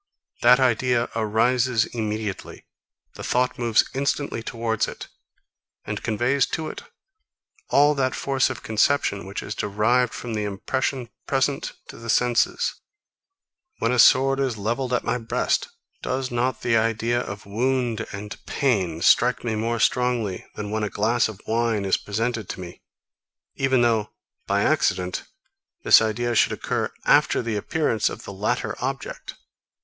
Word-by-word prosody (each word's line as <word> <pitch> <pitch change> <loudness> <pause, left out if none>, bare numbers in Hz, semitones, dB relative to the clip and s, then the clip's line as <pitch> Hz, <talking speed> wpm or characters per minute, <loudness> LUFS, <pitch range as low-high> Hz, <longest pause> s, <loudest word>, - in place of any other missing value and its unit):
That 125 +2 +6
idea 125 -1 +2
arises 115 +2 +2
immediately. 110 -3 -5 0.5
The - - -9
thought 125 0 0
moves 115 -2 +3
instantly 140 -2 -1
towards 115 -1 -1
it, - - -8 0.8
and - - -4
conveys 125 +5 +1
to 160 -1 -3
it - - -8 0.9
all 145 +1 +5
that 130 -2 0
force 135 -1 +1
of - - -6
conception, 110 -3 +1
which 100 - -5
is 100 - -5
derived 110 +5 +1
from 120 -2 -6
the 105 -1 -1
impression 120 +5 -2 0.2
present 135 +1 0 0.2
to - - -10
the 115 0 -9
senses. 120 +1 +2 1.0
When 115 - 0
a 125 - +1
sword 135 +2 +6
is 130 -5 -1
levelled 120 +5 -2
at 125 - +1
my 125 - -1
breast, 115 -1 0 0.3
does 130 0 -2
not 120 +1 -1
the 115 - +2
idea 115 +2 +1
of 100 -2 -7
wound 120 +1 -1
and 105 +1 -8
pain 95 - 0
strike 125 +5 +4
me 115 -2 -1
more 115 +2 -1
strongly, 120 -7 0
than 105 -1 -5
when 110 0 -1
a 105 - -1
glass 115 +4 +1
of 105 -3 -9
wine 115 -2 0
is 95 - +2
presented 110 0 -3
to - - -5
me, 90 -1 -9 0.7
even 130 -2 +2
though 110 -3 +1 0.4
by - - +2
accident 90 -1 0 0.6
this - - +7
idea 120 +2 -1
should - - +3
occur - - -2
after - - +4
the 115 -2 -2
appearance 115 0 0
of - - -8
the 100 - -8
latter 100 +2 -1
object? - - -5
115 Hz, 150 wpm, -24 LUFS, 105-125 Hz, 1.0 s, this